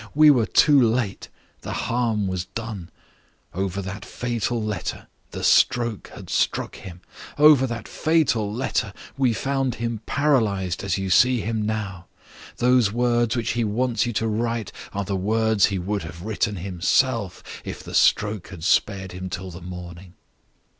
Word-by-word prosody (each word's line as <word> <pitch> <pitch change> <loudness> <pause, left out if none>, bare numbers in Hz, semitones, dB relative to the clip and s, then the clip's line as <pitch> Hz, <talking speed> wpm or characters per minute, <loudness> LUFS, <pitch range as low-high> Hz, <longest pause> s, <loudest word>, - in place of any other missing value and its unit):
We 155 0 +8
were 120 -6 +2
too 145 -3 +5
late; 115 -3 0 0.3
the - - -5
harm 115 -4 0
was 95 -2 -2
done. 110 -4 -6 0.6
Over 95 +2 -2
that 100 +2 -6
fatal 120 0 -2
letter, 105 -4 -4 0.2
the - - -7
stroke 120 -4 +3
had - - -10
struck - - -1
him 90 -2 -10 0.4
over 145 -3 +6
that 115 -2 -5
fatal 145 -10 +1
letter, 110 -3 -2 0.2
we 130 -2 +2
found 135 0 -1
him 115 -1 -3
paralyzed 110 - +1
as 95 -1 0
you 95 -1 -3
see 125 +3 +4
him 110 +1 -2
now. 105 -4 -4 0.5
Those 125 -4 +3
words 120 0 +1
which 120 -2 -1
he 120 0 0
wants 115 +2 0
you 120 - -2
to 110 +2 0
write 115 -1 -2 0.2
are 100 0 -3
the 100 +1 -2
words 110 +2 +2
he 100 - -2
would 100 +3 -2
have 80 +1 -9
written 105 0 -1
himself 95 +4 0 0.2
if - - -7
the - - -9
stroke 105 -3 +2
had 90 -5 -10
spared 95 +1 +1
him 90 +1 -6
till 90 +1 -6
the 85 +2 -10
morning. 90 0 -9
110 Hz, 160 wpm, -23 LUFS, 95-120 Hz, 0.6 s, We